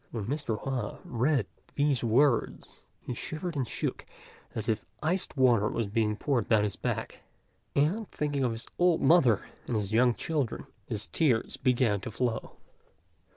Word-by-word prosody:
When 110 -4 -4
Mr. 130 -4 -2
Hua 135 -2 -3
read 125 0 +1 0.3
these 140 -4 +2
words 120 +2 +1 0.2
he - - -3
shivered 160 +7 -5
and 130 -4 -1
shook - - -3 0.5
as 110 -1 -3
if 110 -2 0 0.2
iced 175 0 0
water 120 -5 +4
was 115 - -1
being 105 +1 0
poured 125 +2 0
down 110 -2 +4
his 105 -2 -1
back, - - -3 0.6
and 180 +10 +1
thinking 145 -2 -1
of 125 - +1
his 115 0 -5
old 175 -2 +3
mother 135 - +5 0.2
and 120 - -1
his 105 -1 -1
young 120 +1 +4
children, 145 -8 -2 0.2
his 110 -3 -2
tears 130 -9 +1
began 120 -6 +2
to 125 - -5
flow. 115 0 -2
125 Hz, 155 wpm, -29 LUFS, 110-145 Hz, 0.6 s, mother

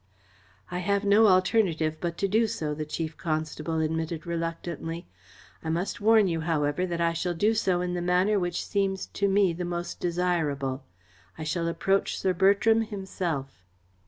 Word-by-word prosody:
"I 180 - -2
have 200 +2 0
no 210 +2 +6
alternative 185 -5 +2
but 170 -1 -3
to 200 - +1
do 220 +4 +3
so," 160 -9 -3
the 155 0 -5
Chief 160 0 -4
Constable 160 0 -2
admitted 160 0 -2
reluctantly. 165 0 -4 0.6
"I 160 - -3
must 175 +5 -2
warn 220 -1 +5
you, 165 -2 -1
however, 160 +1 0
that 170 -1 -3
I 170 0 +2
shall 175 +1 -2
do 210 +6 +2
so 185 -5 +1
in 180 0 -2
the 175 - -2
manner 180 +4 +2
which 175 -1 -2
seems 195 -2 -1
to 200 - -1
me 195 -2 +3
the 175 +2 -4
most 175 0 -4
desirable. 160 -7 -1 0.5
I 160 - -5
shall 165 +2 -1
approach 195 +3 0
Sir 185 - +1
Bertram 200 +5 +4
himself." 180 - -4
175 Hz, 165 wpm, -27 LUFS, 160-195 Hz, 0.6 s, no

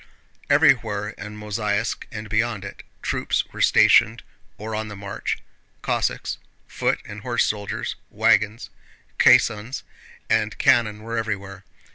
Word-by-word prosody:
Everywhere 120 -9 +3
in 105 -1 -9
Mozháysk 105 +1 -2
and 105 0 -6
beyond 110 -1 -1
it, 100 - -9 0.2
troops - - 0
were - - -5
stationed - - +5 0.3
or 110 +1 -6
on 110 0 -3
the 105 - -8
march. 100 0 -4 0.5
Cossacks, - - -1 0.3
foot - - -1
and 100 +1 -9
horse 120 +1 +1
soldiers, 105 -1 -3
wagons, 105 +5 +2 0.5
caissons, 115 +3 +4 0.4
and 110 -1 +1
cannon 115 -5 +3
were 115 +1 -2
everywhere. 100 -3 -5
105 Hz, 120 wpm, -23 LUFS, 105-115 Hz, 0.5 s, stationed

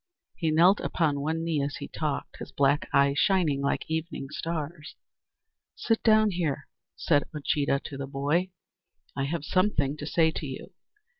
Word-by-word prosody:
He 165 - -1
knelt 175 +6 +5
upon 150 -4 0
one 160 +3 -1
knee 165 -3 0
as 140 +1 -2
he - - -6
talked, 150 -3 -4
his - - -8
black 140 +1 +2
eyes 140 0 +3
shining 170 -8 +2
like 140 - -1
evening 160 -3 -4
stars. 155 0 -5 0.8
"Sit 225 -1 0
down 215 -1 +4
here," 155 -6 -2 0.3
said 145 -3 +2
Uncheedah 140 -1 0
to 140 - -7
the 135 0 -5
boy; 145 +7 0 0.7
"I 135 - -1
have 150 +1 -3
something 150 -8 +1
to 150 - -6
say 160 +1 +3
to 155 - -5
you. 135 +8 -8
155 Hz, 160 wpm, -27 LUFS, 140-170 Hz, 0.8 s, knelt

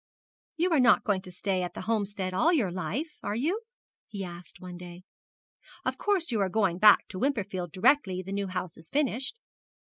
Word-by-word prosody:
'You 345 +3 +1
are 315 - +4
not 245 -4 +5
going 205 -5 +1
to 185 - -10
stay 185 +1 -1
at 180 - -4
the - - -5
Homestead 205 -4 -1
all 310 - +3
your 240 - +2
life, 190 - -3
are 205 - -2
you?' 330 - 0 0.5
he 200 -3 -5
asked 175 -2 -9
one 180 -1 -8
day. 175 0 -10 0.8
'Of - - -1
course 380 -7 +1
you 220 -3 +1
are 195 - +1
going 190 -4 +1
back 210 0 +7
to 185 - -6
Wimperfield 200 - -1
directly 190 - +2
the 190 - -8
new 200 0 -1
house 185 -2 -4
is 160 - -11
finished?' 275 - -1
200 Hz, 190 wpm, -28 LUFS, 185-260 Hz, 0.8 s, back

